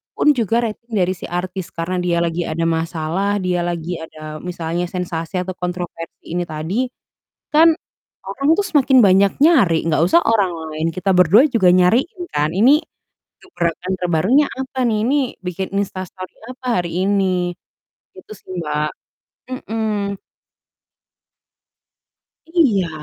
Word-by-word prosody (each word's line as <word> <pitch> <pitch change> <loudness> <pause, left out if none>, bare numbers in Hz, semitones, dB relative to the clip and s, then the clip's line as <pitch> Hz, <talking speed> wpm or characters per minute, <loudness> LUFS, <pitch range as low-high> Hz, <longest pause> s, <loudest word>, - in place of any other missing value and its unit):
pun 300 - +4
juga 230 0 +1
rating 230 +1 -6
dari 185 -1 +2
si - - -8
artis, 180 +1 -4
karena 175 +2 -2
dia 175 -1 0
lagi 170 +1 -1
ada 165 +1 -2
masalah, 165 +4 -1
dia 180 -1 0
lagi 170 0 -3
ada, 155 -1 -8
misalnya 175 -1 -3
sensasi 170 -1 -4
atau 185 - -5
kontroversi 175 -2 -6
ini 175 +1 -1
tadi. 160 +11 -2 0.7
Kan, 325 +2 +7 0.6
orang 275 +8 -2
tuh 410 - +1
semakin 270 -3 +3
banyak 195 +1 +5
nyari, 245 - +5
enggak 155 -1 +2
usah 340 - +5
orang 205 -5 +3 0.2
lain, 155 +1 -1
kita 185 +3 0
berdua 180 - +6
juga 205 -7 +4
nyariin 225 - +2
kan. 150 +1 +1
Ini, 225 +9 +5 0.7
gebrakan 180 - -3
terbarunya 180 - +3
apa 265 0 -5
nih? 220 - +1
Ini 270 - +2 0.3
bikin 180 +1 -3
instastory 185 -2 -5 0.2
apa 255 0 -14 0.2
hari 175 +2 -2
ini? 185 -3 +1 0.7
Gitu 185 - -12
sih, - - -17
Mbak. 150 -1 -1 0.6
Mhm. 215 -5 -3 2.3
Iya. 245 - +2
185 Hz, 135 wpm, -19 LUFS, 170-220 Hz, 2.3 s, Kan